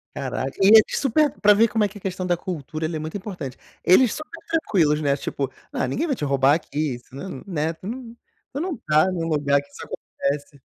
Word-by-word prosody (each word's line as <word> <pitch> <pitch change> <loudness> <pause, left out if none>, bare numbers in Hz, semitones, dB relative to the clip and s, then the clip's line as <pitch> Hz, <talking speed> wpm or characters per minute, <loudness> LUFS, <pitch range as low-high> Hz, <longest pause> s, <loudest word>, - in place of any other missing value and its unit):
Caraca, 135 0 -3
e 190 - +6
eles 220 0 +7
super 290 +3 +3
pra 210 0 +7
ver 220 +3 +5
como 220 -1 +1
é 205 - +3
que 205 - -12
a - - -13
questão 185 -1 -3
da 175 -1 +2
cultura, 160 -3 -4
ela 160 +1 -3
é - - -2
muito 155 +5 -4
importante. 185 - -7 0.3
Eles 215 +6 +5
super 310 +2 -8
tranquilos, 170 - +2
né, 140 -2 +2
tipo: 140 -1 -3 0.2
"Ah, - - -1
ninguém 230 - -1
vai 280 - 0
te 150 - -3
roubar 140 0 +4
aqui". 150 -4 -2
Isso, 120 +1 -16
ne 160 -1 -7
né? 160 -3 -1
Tu 180 +4 -11
não 235 0 -6 0.4
tu 275 - -3
não 345 -1 -2
tá 155 +4 +2
num 170 -3 -2
lugar 140 -3 +2
que 140 - -20
isso 145 - -10
acontece. 140 0 -4
165 Hz, 230 wpm, -23 LUFS, 145-210 Hz, 0.4 s, eles